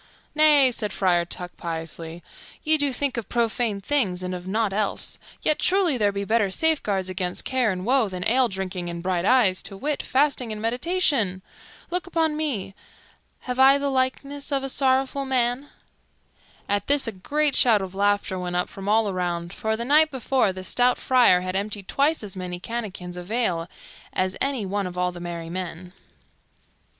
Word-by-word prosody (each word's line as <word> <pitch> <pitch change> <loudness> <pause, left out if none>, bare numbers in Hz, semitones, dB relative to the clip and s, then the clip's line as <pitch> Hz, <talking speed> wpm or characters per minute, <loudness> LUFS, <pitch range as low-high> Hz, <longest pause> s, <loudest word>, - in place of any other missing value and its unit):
"Nay," 295 -4 +6
said 210 -3 -2
Friar 175 -3 +2
Tuck 175 +1 -5
piously, 165 0 -5 0.4
"ye 315 +1 +4
do 285 -1 +2
think 260 0 -2
of 230 - -4
profane 230 -3 0
things 195 -7 0
and 180 0 -3
of 180 0 -7
nought 210 0 0
else; 210 0 -1 0.2
yet, 305 - +2
truly, 370 -6 +2
there 210 -4 +2
be 200 0 -4
better 215 -1 +2
safeguards 205 - 0
against 185 -1 -2
care 255 -4 +1
and 185 0 -4
woe 250 -3 +2
than 180 -1 -3
ale 255 +2 +3
drinking 190 -3 -4
and 170 0 -6
bright 180 -1 0
eyes, 210 -6 +4
to 195 - -5
wit, 290 +7 -2
fasting 260 -3 +1
and 215 - -5
meditation. 235 - 0 0.5
Look 360 +1 -1
upon 320 -3 0
me, 275 -11 -2 0.7
have 250 0 -4
I 270 +1 +7
the 280 0 -1
likeness 275 +2 -2
of 275 -1 0
a 270 - -3
sorrowful 265 +1 +1
man?" 255 +1 0 1.0
At 205 0 -1
this 285 -2 +2
a - - -1
great 285 +9 0
shout 220 -5 +5
of 190 -1 -7
laughter 200 -1 0
went 180 -1 -4
up 180 - 0
from 195 +1 -6
all 220 0 +3
around, 175 -2 -3
for 220 +1 -2
the 235 - -4
night 305 +4 +5
before 260 -5 +1
the 185 0 -8
stout 245 +5 +2
Friar 245 -8 +4
had 185 0 -4
emptied 200 0 -3
twice 290 -1 +1
as 200 -2 -6
many 180 -1 -5
canakins 190 -5 -6
of 180 +1 -8
ale 185 -8 0 0.4
as 185 0 -1
any 270 -6 0
one 200 0 -2
of 180 0 -8
all 180 0 0
the 175 - -10
merry 170 -1 -6
men. 180 0 -6
215 Hz, 180 wpm, -24 LUFS, 185-265 Hz, 1.0 s, I